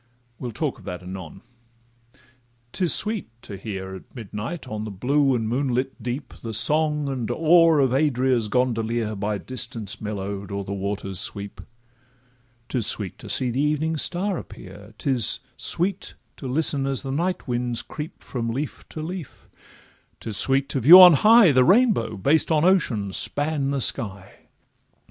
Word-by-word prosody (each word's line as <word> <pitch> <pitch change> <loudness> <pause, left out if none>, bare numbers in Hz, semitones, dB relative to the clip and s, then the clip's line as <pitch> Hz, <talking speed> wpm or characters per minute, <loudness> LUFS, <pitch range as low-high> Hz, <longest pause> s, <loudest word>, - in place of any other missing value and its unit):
We'll 125 - -5
talk 135 +5 -4
of - - -17
that 90 0 -7
anon.—'Tis 120 - -9
sweet 215 - +3
to 100 - -8
hear 95 -1 -7
At 95 - -13
midnight 115 - -7
on 110 -3 -5
the 110 - -6
blue 135 +7 +1
and 115 -2 -2
moonlit 130 +1 -2
deep 125 +2 -5
The 115 -2 -4
song 150 +5 +3
and 130 -4 -4
oar 165 0 +4
of 135 -3 +2
Adria's 130 -5 +1
gondolier, 115 -2 -1
By 105 +1 -3
distance 120 -3 -4
mellow'd, 100 -1 -5
o'er 100 0 -4
the 100 - -6
waters 100 -1 -4
sweep; 100 0 -5 1.1
'Tis 120 -5 -2
sweet 100 -5 0
to - - -10
see 125 -2 0
the 130 +4 -1
evening 150 +2 -1
star 185 +5 -1
appear; 100 +3 -13
'Tis 130 -6 +3 0.2
sweet 185 +2 0 0.2
to 135 - -7
listen 140 0 -1
as 135 0 -1
the 135 - -5
night 175 +5 -2
winds 120 -1 -2
creep 155 +3 -9
From 115 -3 -4
leaf 135 +6 -6
to 155 - -7
leaf; 175 -3 -8 0.7
'tis 110 -3 -6
sweet 135 +5 +3
to 135 - -1
view 160 +10 +9
on 180 -2 +10
high 215 - +6
The 130 -2 +4
rainbow, 190 - +2
based 150 - +1
on 155 +1 +2
ocean, 120 - +1
span 145 +2 0
the 140 0 -1
sky. 100 -7 +1
125 Hz, 155 wpm, -23 LUFS, 110-150 Hz, 1.1 s, on